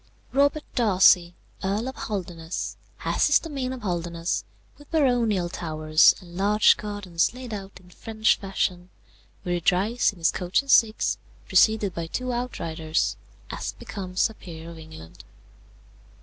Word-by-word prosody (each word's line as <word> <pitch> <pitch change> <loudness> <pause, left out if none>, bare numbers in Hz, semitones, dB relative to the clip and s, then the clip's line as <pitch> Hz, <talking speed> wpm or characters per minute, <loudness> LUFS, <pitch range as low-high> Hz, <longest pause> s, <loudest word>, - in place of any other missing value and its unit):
"Robert 285 +2 +2
Darcy, 185 -6 +4 0.3
Earl 205 +5 -1
of 265 - -5
Holderness, 175 -5 -5 0.3
has - - +2
his 290 - +6
domain 275 -6 -4
of 260 -3 -7
Holderness, 170 -2 -2 0.4
with 290 - -16
baronial 240 - +2
towers, 155 -2 +3
and 175 -3 -14
large 205 +3 +4
gardens 205 -2 -2
laid 250 -3 -7
out 195 -1 -7
in 180 -1 -20
French 220 +3 +1
fashion, 185 -2 -2 0.5
where 175 - -2
he 175 - -1
drives 205 +10 +2
in 200 - -17
his 165 -1 +2
coach 180 +8 0
and 275 - -2
six, 225 -2 +3 0.3
preceded 215 -4 +3
by 170 -1 -4
two 255 +8 -3
outriders, 165 -10 -2 0.4
as - - -4
becomes 185 -2 -2
a 220 - -12
peer 165 -4 -10
of 165 - -11
England. 155 - -12
195 Hz, 145 wpm, -25 LUFS, 170-230 Hz, 0.5 s, his